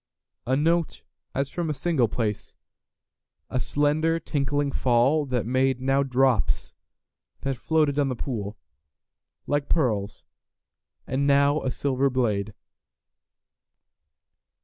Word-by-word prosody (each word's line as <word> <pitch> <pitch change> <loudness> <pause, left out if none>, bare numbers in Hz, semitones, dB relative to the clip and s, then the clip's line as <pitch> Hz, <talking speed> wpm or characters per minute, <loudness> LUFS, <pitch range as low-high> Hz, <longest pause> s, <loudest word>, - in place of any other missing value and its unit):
A 130 - +2
note 165 +3 0 0.3
as 140 0 -1
from 170 -2 -2
a 150 - -1
single 150 -7 +1
place,A 110 +3 -7
slender 150 +5 +1
tinkling 145 -2 -1
fall 135 +5 +2
that 125 -4 -1
madeNow 135 +2 +1
drops 125 -6 +1 0.7
that 135 -1 -1
floated 150 +2 +1
on 140 -1 +2
the 130 - -2
poolLike 100 - -6
pearls, 110 -10 0 0.8
and 140 +2 0
now 140 +1 +4
a 130 - -1
silver 135 +1 0
blade. 110 -5 -1
135 Hz, 100 wpm, -25 LUFS, 120-145 Hz, 0.8 s, now